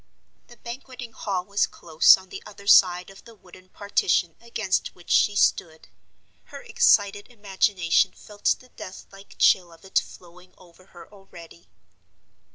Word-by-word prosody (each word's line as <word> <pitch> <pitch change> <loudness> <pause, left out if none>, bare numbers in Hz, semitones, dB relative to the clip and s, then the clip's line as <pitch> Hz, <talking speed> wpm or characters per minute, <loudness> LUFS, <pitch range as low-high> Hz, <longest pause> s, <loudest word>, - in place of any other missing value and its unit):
The 240 - -17
Banqueting 250 0 -10
Hall 190 -5 -4
was 200 +1 0
close 160 +1 +4
on 190 0 -16
the - - -9
other 200 -1 -14
side 180 -2 +4
of 195 - -17
the 230 - -16
wooden 185 -1 -19
partition 185 -4 -1
against 220 -5 -3
which 175 - -11
she 205 - +3
stood; 160 -5 0 0.6
her - - -12
excited 205 - +2
imagination 195 -5 0
felt 205 -1 -2
the 255 - -20
death 185 -5 -11
like 195 0 -16
chill 180 -2 +3
of 165 +3 -18
it 190 - +1
flowing 180 +1 -16
over 180 +1 -21
her 175 - -15
already. 170 -4 -16
195 Hz, 150 wpm, -24 LUFS, 180-205 Hz, 0.6 s, close